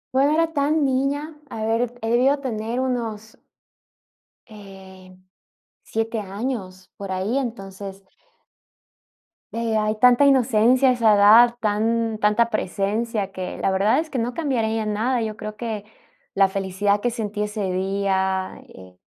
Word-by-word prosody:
Bueno 275 +2 +4
no - - +2
era 330 0 +1
tan 295 +1 +1
niña, 280 +4 -1
a 220 0 -4
ver, 240 +2 -1
he 225 - -2
debido 265 +4 +3
tener 230 -2 -3
unos 225 -4 -3 1.1
em, 190 -3 -14 0.6
7 225 0 -2
años, 195 -2 -5
por 195 -1 -6
ahí, 190 +7 -1
entonces 195 -5 -6 1.5
eh, 230 -1 -1
hay 215 0 0
tanta 250 +3 +6
inocencia 255 -1 +4
a - - +5
esa 230 -4 +3
edad, 225 +4 +7
tan 225 +1 0
tanta 215 +2 +2
presencia, 210 0 -2
que 185 -1 -6
la 195 - +1
verdad 200 +8 +2
es 320 -1 -4
que 265 - -4
no 235 +2 -2
cambiaría 225 -8 -1
nada, 230 +4 0
yo 215 -1 -4
creo 215 -1 -7
que 215 -2 -5 0.5
la 195 -1 +4
felicidad 195 +1 0
que 245 - 0
sentí 210 -3 -3
ese 210 -3 -3
día, 190 0 -1
eh, 95 -1 -15
220 Hz, 140 wpm, -22 LUFS, 200-245 Hz, 1.5 s, edad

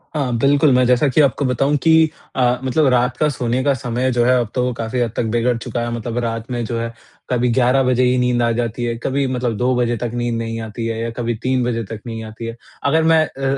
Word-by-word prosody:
हाँ, 130 -5 0
बिल्कुल, 140 +3 +3
मैं 125 0 +4
जैसा 125 +3 +3
कि 135 +3 +3
आपको 140 0 +2
बताऊँ 135 +3 +1
कि 160 0 +5 0.3
अ, 125 -1 +2
मतलब 135 +3 +2
रात 125 0 +1
का 155 - +2
सोने 125 -1 -1
का 140 0 +3
समय 125 +1 -1
जो 120 -1 +2
है, 125 0 +4
अब 120 -3 -2
तो 125 - +1
वो 125 - -1
काफ़ी 115 +2 -3
हद 115 -3 0
तक - - 0
बिगड़ 120 +1 +2
चुका 120 +1 -4
है। 120 0 -2
मतलब 120 0 -4
रात 115 +1 -4
में 120 -1 -2
जो 115 +1 -3
है, 115 0 -4 0.4
कभी 125 -1 +1
11 130 +2 +3
बजे 130 0 +2
ही 125 0 +3
नींद 125 -1 +1
आ 115 - +2
जाती 120 0 -2
है, 120 -1 -1
कभी 140 +1 0
मतलब 125 -3 -1
2 125 +3 +1
बजे 120 -1 +1
तक 120 0 -3
नींद 120 -1 -1
नहीं 115 0 -4
आती 110 +1 -5
है 115 0 -3
या 115 - -2
कभी 120 -1 -1
3 130 -1 +1
बजे 115 -1 -1
तक 110 - -5
नहीं 115 -1 -5
आती 110 +1 -8
है। 115 0 -5 0.3
अगर 160 +3 +3
मैं 160 -1 +4
अ 135 -2 -10
125 Hz, 260 wpm, -19 LUFS, 115-130 Hz, 0.4 s, कि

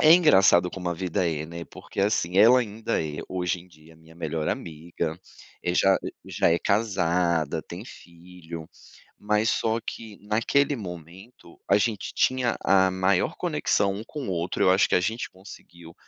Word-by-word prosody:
é 155 +1 +8
engraçado 95 - +5
como 90 -2 -5
a 85 - -1
vida 90 0 -1
é, 75 -1 -3
né, 85 +1 -8
porque - - -7
assim, 95 -3 0
ela 120 +5 +7
ainda 110 -4 -2
é, 75 -1 -5
hoje 90 -1 -2
em 90 - -16
dia, 80 -1 -19
minha 80 0 -18
melhor 80 -2 -3
amiga, 80 +1 -4 0.6
já 95 +1 +4 0.3
já - - +1
é 85 - +3
casada, 90 -7 +1
tem - - -8
filho, 85 -1 -11 0.5
mas 105 +1 +1
só 115 0 0
que 110 -3 -7
naquele 115 +7 +1
momento, 90 - -11
a 100 - +6
gente 105 -1 -1
tinha 130 -2 +1
a 95 -1 +4
maior 95 0 +1
conexão 100 -1 0
um 105 - -6
com 140 +3 -7
o 95 - -2
outro, 85 0 -1
eu 95 - +5
acho 95 +2 +3
que - - +3
a - - +5
gente 110 +5 -2
conseguiu, 85 -3 -14
95 Hz, 170 wpm, -25 LUFS, 85-105 Hz, 0.6 s, é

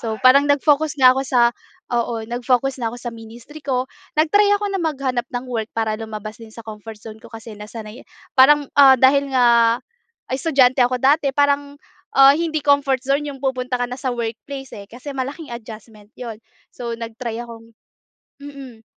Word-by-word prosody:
So 225 -1 -3
parang 270 +3 +6
nag-focus 295 +1 +2
nga 255 -1 +8
ako 265 - -1
sa, 240 -2 +3 0.4
oo 235 -1 -1
nag-focus 250 +3 -1
na 230 - 0
ako - - -7
sa 240 - -4
ministry 230 +6 -12
ko, 260 -2 -1 0.3
nag-try 410 +7 +4
ako 410 0 -3
na 390 - -1
maghanap 270 -6 -2
ng 245 0 -4
work 225 -3 -2
para 220 -1 0
lumabas 215 -1 -7
din 225 - -12
sa 230 - -10
comfort 220 0 -9
zone 220 -1 -10
ko - - -12
kasi 225 0 -10
nasanay, 215 +1 -9 0.4
parang, 290 +2 +6
ah, 270 -2 +9
dahil 275 +2 +4
nga 235 -2 +4 0.5
estudyante 260 -1 +2
ako 255 0 -2
dati 280 +1 +3
parang, 285 0 +1 0.4
ah, 275 0 +8
hindi 315 -3 -2
comfort 280 -3 +2
zone 280 +2 0
'yong 275 -2 -9
pupunta 255 -1 -2
ka 245 - 0
na 250 - -5
sa 255 -1 -2
workplace, 240 +4 -6
eh, 200 -1 -10
kasi 255 +6 -9
malaking 275 +3 -5
adjustment 215 -2 -11
'yon. 230 -4 -7 0.4
So, 235 -1 -5
nag-try 230 0 -6
akong 230 -1 -12 0.7
mm 270 -6 -11
250 Hz, 175 wpm, -20 LUFS, 230-280 Hz, 0.7 s, ah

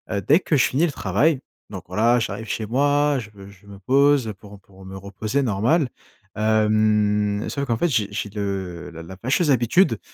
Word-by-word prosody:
heu, 100 - -1
dès 150 - +4
que 160 - -1
je 130 - +4
finis 145 +7 +1
le 160 - -2
travail, 130 - +1 0.3
donc 95 -3 -8
voilà, 115 +7 +2
j'arrive 110 -1 -4
chez 110 - -3
moi, 145 +4 +1
je 110 -3 -9
me 100 -1 -13
je 100 0 -19
me 100 -1 -11
pose 135 0 +2
pour 105 0 -13
pour 95 -1 -17
me 95 0 -9
reposer, 100 +7 -3
normal, 125 - +1 0.5
hem, 105 -1 +1
sauf 140 -1 -3
qu'en 120 -4 0
fait, 175 +10 0
j'ai 110 -7 0
j'ai 105 0 -4
le 95 -4 -5
la 85 0 -10
la 95 +3 -11
fâcheuse 135 - +1
habitude 130 +9 +2
110 Hz, 195 wpm, -22 LUFS, 100-135 Hz, 0.5 s, dès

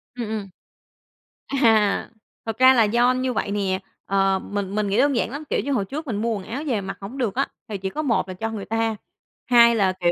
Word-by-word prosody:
Ừm, 240 -3 -4
ừm. 210 -3 -4 1.0
À, 225 -7 +2 0.4
thật 225 -1 -4
ra 260 +1 +7
là 230 -3 +5
do 240 +4 +3
như 255 0 -1
vậy 220 - -2
nè, 195 -2 -1 0.2
ờ, 195 -1 +2
mình 200 0 -4
mình 210 0 0
nghĩ 200 +3 +1
đơn 280 +1 +3
giản 230 - 0
lắm, 285 +4 -6
kiểu - - +1
như, 280 - -1
hồi 235 -7 +1
trước 300 +10 -6
mình 230 -6 -2
mua 230 0 0
quần 200 -3 -5
áo 255 +9 -5
về 240 -7 0
mặc 195 0 -6
hông 205 +8 -8
được 235 -7 -1
á 275 +2 +1 0.2
thì 210 -2 -4
chỉ 190 0 -4
có 305 - -3
một 230 -9 0
là 185 - -5
cho 220 +5 -3
người 215 -3 -5
ta, 225 0 -1 0.5
hai 235 -1 +6
là, 195 -4 +2
kiểu, 175 -1 +3
225 Hz, 245 wpm, -23 LUFS, 195-250 Hz, 1.0 s, ra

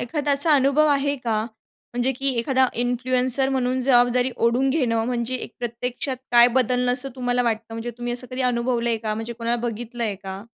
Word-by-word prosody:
एखादा 290 +4 -2
असा 285 +3 +4
अनुभव 280 +2 +3
आहे 285 0 +1
का? 230 -4 -1 0.5
म्हणजे 245 +2 0
की 270 +2 -3
एखादा 260 +2 +2 0.2
इन्फ्लुएन्सर 255 +2 +2
म्हणून 260 -1 0
जबाबदारी 245 0 +3
ओढून 240 +3 +1
घेणं 235 -7 0
म्हणजे 245 0 -2
एक 245 - -6
प्रत्यक्षात 245 +2 -4 0.2
काय 240 0 +7
बदलणं 250 0 +1
असं 255 +2 +3
तुम्हाला 245 -1 0
वाटतं? 225 -1 -1
म्हणजे 230 +1 -5
तुम्ही 240 0 -3
असं 245 +1 0
कधी 255 +1 -3
अनुभवलंय 235 -1 0
का? 215 -1 -3
म्हणजे 225 +2 -5
कोणाला 235 +1 -2
बघितलंय 235 -1 -4
का? 195 0 -8
245 Hz, 175 wpm, -23 LUFS, 235-260 Hz, 0.5 s, काय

